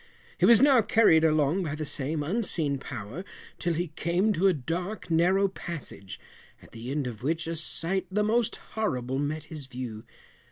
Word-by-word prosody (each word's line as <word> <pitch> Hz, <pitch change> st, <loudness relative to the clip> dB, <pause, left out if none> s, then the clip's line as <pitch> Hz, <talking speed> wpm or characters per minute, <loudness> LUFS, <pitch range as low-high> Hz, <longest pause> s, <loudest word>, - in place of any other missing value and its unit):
He -, -, +5 dB
was 235 Hz, +1 st, +8 dB
now 275 Hz, -4 st, +6 dB
carried 210 Hz, -7 st, +5 dB
along 155 Hz, +2 st, +3 dB
by 155 Hz, -4 st, -3 dB
the 155 Hz, 0 st, -4 dB
same 150 Hz, +2 st, -2 dB
unseen 160 Hz, -, 0 dB
power 125 Hz, -, -7 dB, 0.4 s
till 170 Hz, -1 st, 0 dB
he 175 Hz, +1 st, -2 dB
came 175 Hz, +7 st, +1 dB
to 190 Hz, +2 st, +3 dB
a 190 Hz, -, +4 dB
dark 175 Hz, +8 st, -4 dB
narrow 185 Hz, +4 st, +4 dB
passage, 165 Hz, -, -7 dB, 0.4 s
at -, -, -18 dB
the 115 Hz, +2 st, -8 dB
end 145 Hz, 0 st, -1 dB
of 120 Hz, -3 st, -6 dB
which 160 Hz, +5 st, -1 dB
a 165 Hz, +1 st, -3 dB
sight 170 Hz, +4 st, -2 dB
the 210 Hz, +2 st, +1 dB
most 225 Hz, +1 st, +1 dB, 0.2 s
horrible 130 Hz, -, -1 dB
met 150 Hz, +1 st, -2 dB
his 155 Hz, -3 st, -8 dB
view. 125 Hz, -4 st, -6 dB
160 Hz, 175 wpm, -28 LUFS, 140-190 Hz, 0.4 s, was